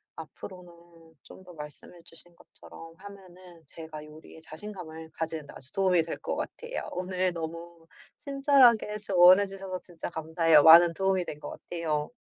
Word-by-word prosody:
앞으로는 170 -3 -13
좀 190 - -15
더 180 - -13
말씀해 150 +3 -10
주신 170 +1 -15
것처럼 165 -1 -14
하면은 185 -3 -14
제가 155 0 -10
요리에 155 +1 -15
자신감을 160 -1 -10
가지는 160 -2 -5
데 - - -12
아주 135 - -12
도움이 185 -3 +2
될 165 - -6
것 - - -4
같아요. 475 +1 -6
오늘 185 0 -1
너무 165 0 -8 0.3
친절하게 270 -6 +3
조언해 185 0 +6
주셔서 195 -1 -7
진짜 175 -3 -8
감사해요. 160 -1 +3
많은 165 +1 +8
도움이 190 0 0
된 150 - -8
거 - - -8
같아요. 155 -3 -4
170 Hz, 345 characters per minute, -28 LUFS, 160-190 Hz, 0.3 s, 많은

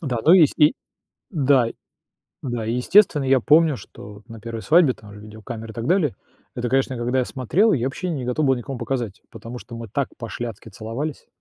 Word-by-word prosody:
Да, 130 -8 -2
ну 165 - +7
и 190 - +8
ес 155 - +6
и 150 +1 +5 0.6
да, 140 - +3 0.8
да. 120 -4 -3
И 115 - -1
естественно, 150 +3 +4
я 135 -1 +3
помню, 155 +3 +4
что 105 0 -12
на 115 -1 -10
1 115 0 -6
свадьбе 160 -4 +5
там 105 -2 -15
же 105 - -12
видеокамеры 110 +2 -9
и - - -11
так 115 0 -4
далее, 165 - +2 0.4
это, 120 0 -3
конечно, 135 0 +1
когда 125 +2 -1
я 130 - +2
смотрел, 150 - +1
я 125 -3 0
вообще 175 +7 -3
не 140 -6 -3
готов 125 +5 -1
был 135 - +4
никому 125 +1 -6
показать, 120 -6 -4
потому 115 +2 -9
что 120 - -11
мы 115 -1 -7
так 135 +6 -1
пошляцки 115 -2 -6
целовались. 115 +8 -6
125 Hz, 205 wpm, -22 LUFS, 115-145 Hz, 0.8 s, и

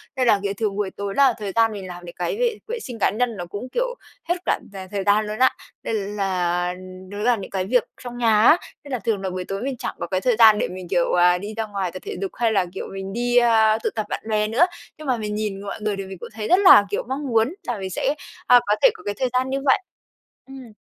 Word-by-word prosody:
nên 255 -2 +1
là, 210 -3 +5
kiểu, 200 0 -1
thường 210 -3 -1
buổi 205 -2 -1
tối 200 -1 -5
là 275 -3 +5
thời 205 -3 -4
gian 225 -1 +4
mình 195 -3 -7
làm 175 0 -9
những 170 - -10
cái 180 - -2
vệ 475 -2 0
vệ 475 +1 -3
sinh 245 - -8
cá - - +3
nhân 230 0 -1
nó 175 - -5
cũng, 205 +8 -7
kiểu, - - -1 0.3
hết 350 - +3
cả - - +1
cả 190 -1 -7
thời 200 -2 -2
gian 205 +2 +3
luôn 215 +2 -5
á. 260 - +6 0.3
Nên 225 - -2
là, 185 -3 -1 0.4
nó 205 - -7
là 240 +2 +3
những 200 - -8
cái 190 -1 -1
việc 245 +3 +2 0.2
trong 245 0 -7
nhà 220 -3 +3
á, 310 +9 +7 0.3
nên 285 - -11
là 250 - -1
thường 215 -4 -1
là 190 - -2
buổi 185 0 -4
tối 195 +2 -4
mình 270 -2 -3
chẳng - - -4
có - - -3
cái 185 -1 -1
thời 250 -3 +2
gian 215 -2 +8
để - - 0
mình, 185 0 -8
kiểu, 175 -2 +1
à, 180 0 +5
đi 205 +4 -6
ra 225 - -1
ngoài 195 -4 -3
tập 185 - -7
thể - - -5
dục 195 - -3
hay 230 -2 +1
là, 195 -4 +2
kiểu, - - -5
mình 195 0 -6
đi, 245 +1 +1
a, 220 -2 +5
tụ - - +1
tập 215 -1 -2
bạn - - -4
bè 210 0 +1
nữa. 245 +11 +4 0.3
Nhưng 305 -2 -9
mà 250 -2 +1
mình 210 -1 -4
nhìn 210 -2 -3
mọi 200 +1 -6
người 210 -1 -1
thì 195 - -4
mình 190 -1 -8
cũng - - -8
thấy 215 -1 -4
rất 365 +2 +5
là, 365 - +8
kiểu, - - -2
mong 275 +2 -3
muốn 230 -2 +1 0.3
là 240 -3 -1
mình 190 -1 -4
sẽ, 275 - -1 0.3
a, 245 - +8
có 210 - +3
thể - - +7
có - - -14
cái 205 0 -3
thời 255 -1 +1
gian 255 +1 +1
như 270 - -1
vậy. 265 - +5 0.7
Ừm. 265 -4 -11
215 Hz, 285 wpm, -22 LUFS, 195-245 Hz, 0.7 s, gian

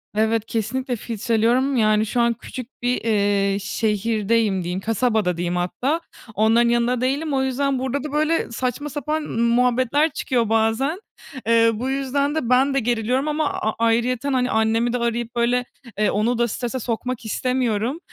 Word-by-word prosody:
Evet, 220 0 +1
kesinlikle 245 +3 -2
filtreliyorum, 235 +4 0
yani, 215 -1 +3
şu 235 +3 0
an 235 0 +3
küçük 245 +2 -10
bir, 245 +1 0
eee, 200 -2 +1
şehirdeyim 215 -1 0
diyeyim, 180 +2 -3
kasabada 220 -4 0
diyeyim 175 0 -2
hatta, 260 - -1 0.3
onların 225 +2 +3
yanında 240 +1 +1
değilim. 280 +4 -1
O 265 0 +1
yüzden 265 0 0
burada 265 +2 -2
da 300 - -5
böyle 310 -3 0
saçma 255 +5 -3
sapan 300 +2 -2
muhabbetler 250 +5 +2
çıkıyor 245 -7 -1
bazen. 225 - +1 0.5
Eee, 230 0 +5
bu 245 +5 -3
yüzden 275 +2 -1
de 255 -7 -2
ben 265 +2 +4
de 275 - +2
geriliyorum 245 +4 0
ama 300 0 0
a 220 - -1
ayrıyeten, 235 +4 +1
hani, 255 -1 +1
annemi 225 +2 +1
de - - +1
arayıp 235 0 -2
böyle, 245 +1 +1 0.3
eee, 215 - +2
onu 225 +4 +1
da 240 0 +2
strese 245 +3 -3
sokmak 240 +1 -3
istemiyorum. 250 +3 -1
235 Hz, 160 wpm, -22 LUFS, 220-260 Hz, 0.5 s, Eee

